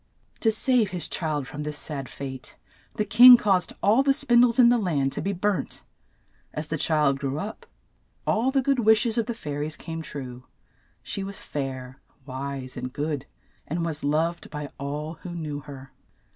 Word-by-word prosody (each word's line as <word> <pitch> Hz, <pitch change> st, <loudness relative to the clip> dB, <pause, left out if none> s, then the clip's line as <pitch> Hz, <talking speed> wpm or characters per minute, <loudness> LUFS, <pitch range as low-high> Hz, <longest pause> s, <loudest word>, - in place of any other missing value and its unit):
To 225 Hz, -, +3 dB
save 230 Hz, -1 st, +2 dB
his 180 Hz, -2 st, -3 dB
child 150 Hz, -6 st, -2 dB
from 145 Hz, +6 st, -7 dB
this 150 Hz, 0 st, -4 dB
sad 140 Hz, -4 st, -5 dB
fate, 130 Hz, -2 st, -8 dB, 0.4 s
the 210 Hz, -, 0 dB
king 245 Hz, +4 st, +10 dB
caused 195 Hz, -5 st, +1 dB
all 220 Hz, +6 st, +5 dB
the 275 Hz, 0 st, +3 dB
spin 245 Hz, -4 st, +4 dB
dies 240 Hz, -1 st, +4 dB
in 245 Hz, -2 st, +7 dB
the 240 Hz, 0 st, +4 dB
land 145 Hz, -9 st, 0 dB
to -, -, -4 dB
be 200 Hz, -, -1 dB
burnt. 195 Hz, -4 st, -2 dB, 0.7 s
As 150 Hz, +1 st, -4 dB
the 155 Hz, -, -1 dB
child 150 Hz, -4 st, +2 dB
grew 140 Hz, 0 st, -2 dB
up, 210 Hz, +7 st, -6 dB, 0.6 s
all 230 Hz, +4 st, +2 dB
the 265 Hz, 0 st, +1 dB
good 275 Hz, 0 st, +2 dB
wish 220 Hz, +1 st, +4 dB
es 235 Hz, 0 st, +1 dB
of 225 Hz, -, -1 dB
the 235 Hz, -, -3 dB
fai 150 Hz, -9 st, -5 dB
ries 150 Hz, +1 st, -3 dB
came 165 Hz, -1 st, -6 dB
true; 130 Hz, -5 st, -7 dB, 0.6 s
she 195 Hz, -, -4 dB
was 195 Hz, 0 st, -6 dB
fair, 130 Hz, -2 st, -6 dB, 0.2 s
wise, 135 Hz, -1 st, -6 dB
and 125 Hz, 0 st, -5 dB
good, 145 Hz, 0 st, -3 dB, 0.4 s
and 165 Hz, +3 st, -2 dB
was 155 Hz, -2 st, -4 dB
loved 160 Hz, +4 st, 0 dB
by 150 Hz, -2 st, -6 dB
all 150 Hz, +3 st, -5 dB
who 175 Hz, -1 st, -7 dB
knew 150 Hz, -3 st, -4 dB
her. 135 Hz, -2 st, -11 dB
155 Hz, 185 wpm, -25 LUFS, 140-215 Hz, 0.7 s, king